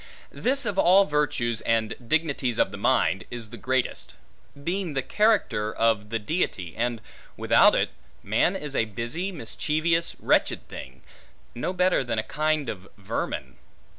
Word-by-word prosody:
This 270 +1 0
of 200 -3 -1
all 190 +3 +6
virtues, 135 - 0
and 115 -1 +1
dignities 140 -5 0
of - - +2
the 100 - -7
mind, 95 -1 +2
is 115 -3 -8
the - - -7
greatest; 130 +3 -2 0.5
being 175 -2 -2
the 135 - 0
character 200 - +2
of 110 -2 +1
the 115 - 0
Deity: 105 - -2
and 120 -1 -1 0.4
without - - +5
it, - - +1 0.3
man 110 - +2
is 150 -6 -5
a 115 - +2
busy, 120 - -3
mischievous, 165 - 0
wretched - - +1
thing; 65 0 -10 0.5
no 125 - -2
better 180 -5 +2
than 115 -2 -3
a 110 - 0
kind 155 +1 0
of 95 -1 -6
vermin. 100 - -4
130 Hz, 150 wpm, -26 LUFS, 110-170 Hz, 0.5 s, all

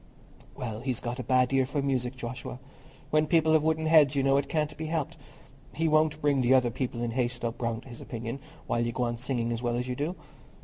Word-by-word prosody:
"Well, 115 -4 -4
he's 125 -1 -2
got 120 +2 -4
a - - -2
bad 130 +1 +2
ear 135 -1 +3
for 140 +1 -1
music, 130 -2 -1
Joshua. 125 0 -6 0.5
When 155 0 +3
people 160 -1 +4
have 155 -1 +4
wooden 160 0 +1
heads, 155 -4 +6
you 135 - +2
know, 135 0 +4
it 140 - -1
can't 150 -1 -1
be 155 +1 -5
helped. 155 -3 -2 0.6
He 165 +1 +1
won't 155 0 +3
bring 140 -2 +3
the 125 +1 +5
other 125 -2 +3
people 120 -1 -3
in 120 - -1
Hayslope 120 -1 -2
round 115 0 -2
to - - -14
his 120 - -9
opinion, 115 +2 -5 0.3
while 120 - 0
you 120 0 -2
go 125 - -1
on 120 -1 -1
singing 120 -2 -1
as 115 0 -2
well 120 -1 0
as 125 +1 -2
you 125 - -2
do." 150 +7 -2
130 Hz, 235 wpm, -28 LUFS, 120-150 Hz, 0.6 s, heads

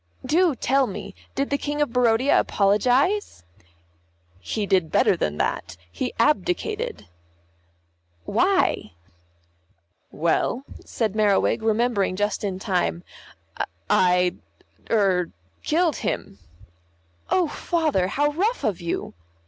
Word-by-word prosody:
"Do 325 +2 +3
tell 265 +2 +2
me, 200 0 -7 0.2
did 275 +1 -1
the 280 - +1
King 295 0 -3
of 295 -5 0
Barodia 250 +2 +3
apologise?" 245 - +1 1.0
"He 210 - -3
did 185 -5 +1
better - - +4
than 75 - -2
that, - - -2
he 250 - -3
abdicated." 390 - 0 1.2
"Why?" - - +1 1.2
"Well," 170 - 0 0.2
said 220 -4 -2
Merriwig, 210 0 +2
remembering 220 -3 +1
just 205 +2 -1
in 195 -2 -2
time, 180 -3 -1 0.9
"I 180 -1 +3 0.5
er 190 -5 +2 0.3
killed 325 0 +1
him." 100 - -4 0.9
"Oh, 360 -3 +2
Father, 310 - 0
how 290 +8 +1
rough 410 +11 -1
of 205 -6 -1
you." 170 - -3
225 Hz, 105 wpm, -24 LUFS, 190-295 Hz, 1.2 s, better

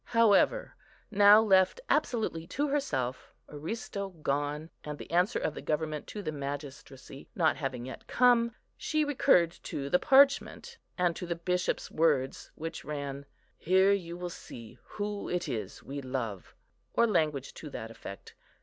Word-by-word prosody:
However, 230 - +4 0.4
now 205 +1 +7
left 190 - +4
absolutely 220 - 0
to 285 +10 -1
herself, 130 - -2
Aristo 195 +6 -5
gone, 150 -1 -3
and 150 -1 -6
the - - -10
answer 180 +7 +2
of - - -1
the - - -7
government 155 -1 -2
to 210 - -6
the 155 - -2
magistracy 140 -2 -7
not 165 -6 +3
having 130 -4 -4
yet 130 - -9
come, 235 -2 +3 0.2
she 310 -1 0
recurred 180 - +4
to 140 -1 -5
the 180 - +5
parchment, 280 - +3 0.2
and 175 -2 +1
to 180 - -6
the 170 - -1
Bishop's 180 +1 -1
words, 150 -5 +1
which 165 +1 -6
ran, 140 -1 -5 0.3
"Here 190 +3 +4
you 175 -4 -1
will 180 0 -5
see 115 -8 -11
who 205 -1 -4
it 180 0 -1
is 105 -5 -5
we 140 +1 -6
love," 125 -7 -5 0.4
or 235 - +5
language 155 - 0
to 155 - -9
that 115 -4 -7
effect. 100 -3 -10
165 Hz, 150 wpm, -30 LUFS, 140-205 Hz, 0.4 s, now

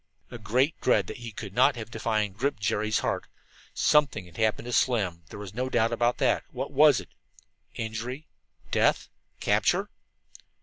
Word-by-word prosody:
A 120 - -7
great 130 +8 0
dread 105 -6 +3
that - - -7
he 120 -2 -7
could 100 -2 -8
not 130 +4 +4
have 115 0 -7
defined 105 -5 -1
gripped 130 +1 -1
Jerry's 105 +1 0
heart. - - -2 0.5
Something 140 -10 +3
had 85 -2 -16
happened 110 0 0
to 125 - -5
Slim; 100 -11 +1
there - - -9
was 100 -2 -8
no 130 +3 -2
doubt 115 -2 +2
about 120 +1 +1
that. 130 -4 +2
What 130 +2 -5
was 145 -1 +6
it? - - -11 0.7
Injury? 120 +6 -5 0.5
Death? - - +2 0.3
Capture? - - +1
115 Hz, 165 wpm, -27 LUFS, 105-130 Hz, 0.7 s, was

